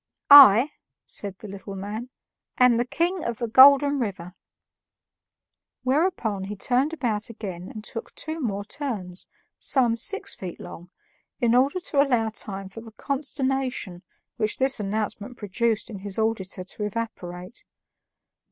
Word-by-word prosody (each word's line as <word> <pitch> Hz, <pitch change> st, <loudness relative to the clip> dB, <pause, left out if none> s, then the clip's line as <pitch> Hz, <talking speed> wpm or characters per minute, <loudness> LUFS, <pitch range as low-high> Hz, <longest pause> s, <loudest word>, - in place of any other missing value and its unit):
"I," 275 Hz, -1 st, +10 dB, 0.3 s
said 200 Hz, -2 st, -5 dB
the 210 Hz, -, -10 dB
little 200 Hz, 0 st, -8 dB
man, 210 Hz, +5 st, -6 dB, 0.5 s
"am 250 Hz, -2 st, +5 dB
the 240 Hz, -, +1 dB
King 345 Hz, +6 st, -1 dB
of 235 Hz, -2 st, -3 dB
the 235 Hz, -, -3 dB
Golden 280 Hz, +4 st, +7 dB
River." 185 Hz, -6 st, -4 dB, 1.5 s
Whereupon 255 Hz, -, 0 dB
he 205 Hz, +2 st, -6 dB
turned 255 Hz, +8 st, +1 dB
about 230 Hz, -9 st, -2 dB
again 190 Hz, -5 st, -7 dB
and 215 Hz, -, -9 dB
took 230 Hz, -, -8 dB
two 315 Hz, +1 st, -4 dB
more 205 Hz, -5 st, -3 dB
turns, 205 Hz, -9 st, -5 dB, 0.3 s
some 245 Hz, -4 st, +2 dB
six 400 Hz, -, -1 dB
feet 185 Hz, -2 st, -8 dB
long, 175 Hz, +1 st, -10 dB, 0.5 s
in 235 Hz, -3 st, +2 dB
order 270 Hz, +8 st, +3 dB
to 295 Hz, -5 st, +1 dB
allow 245 Hz, -6 st, +1 dB
time 195 Hz, -3 st, -5 dB
for 195 Hz, +4 st, -10 dB
the 225 Hz, -1 st, -13 dB
consternation 265 Hz, -8 st, -3 dB, 0.4 s
which 215 Hz, -1 st, 0 dB
this 265 Hz, -1 st, +3 dB
announcement 210 Hz, +3 st, -4 dB
produced 220 Hz, +2 st, -1 dB
in 205 Hz, -4 st, -8 dB
his 195 Hz, 0 st, -5 dB
auditor 210 Hz, -4 st, -2 dB
to 195 Hz, +3 st, -7 dB
evaporate. 195 Hz, -3 st, -6 dB
225 Hz, 140 wpm, -25 LUFS, 200-265 Hz, 1.5 s, I